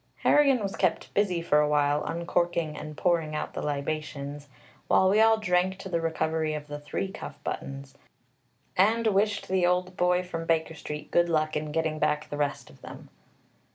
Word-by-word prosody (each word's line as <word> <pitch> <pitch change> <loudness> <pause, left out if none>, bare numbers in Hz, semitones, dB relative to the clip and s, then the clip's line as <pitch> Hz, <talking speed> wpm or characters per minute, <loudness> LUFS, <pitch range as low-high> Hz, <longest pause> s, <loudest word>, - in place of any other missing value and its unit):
Harrigan 275 -6 +4
was 195 -1 -3
kept 185 -3 0
busy 185 -4 +1
for 150 -3 +3
a 150 0 +2
while 145 0 +2
uncorking 170 -1 -1
and 150 0 -8
pouring 165 -4 +1
out - - -4
the - - -4
libations, 145 -1 -4 0.4
while 190 - +4
we 205 +3 +4
all 225 0 +5
drank 185 -2 +1
to 195 0 -8
the 170 -2 0
recovery 160 -1 -1
of 150 -1 -6
the 145 0 -7
three 170 +6 -4
cuff 145 - -8
buttons, 135 0 -5 0.8
and 220 +5 +3
wished 205 0 +1
the 185 -1 +1
old 180 +1 +1
boy 180 0 +2
from 165 -2 -5
Baker 160 -1 +1
Street 150 -1 -7
good 175 0 +3
luck 155 -1 +1
in 150 0 -2
getting 160 0 -1
back 150 0 0
the 145 - -3
rest 145 -1 -2
of - - -20
them. - - -11
165 Hz, 185 wpm, -27 LUFS, 150-185 Hz, 0.8 s, all